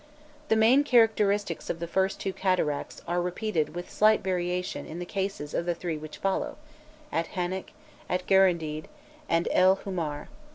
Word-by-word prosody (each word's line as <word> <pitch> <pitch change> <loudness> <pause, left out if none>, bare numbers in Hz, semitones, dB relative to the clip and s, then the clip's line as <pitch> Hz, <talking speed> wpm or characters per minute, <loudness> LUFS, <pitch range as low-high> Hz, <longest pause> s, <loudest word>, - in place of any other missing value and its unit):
The 220 - +4
main 235 +6 +5
characteristics 210 - +2
of - - -1
the 170 - -3
first 190 +3 0
two 190 - -2
cataracts 180 -7 -1
are 175 +1 0
repeated 180 -3 -1
with 175 +1 -6
slight 215 0 +4
variations 180 -1 -2
in 160 - -6
the 175 - -4
cases 190 -6 -3
of 170 - -1
the 175 - +1
three 170 -1 -3
which 155 0 -8
follow, 195 0 -1 0.5
at 165 0 -2
Hannek, 185 +1 -2 0.4
at 180 0 -1
Guerendid, 170 -5 +3 0.4
and 165 +1 +2
El 185 +1 +5
Hu 195 0 -7
mar. 155 -5 -3
180 Hz, 165 wpm, -28 LUFS, 170-195 Hz, 0.5 s, main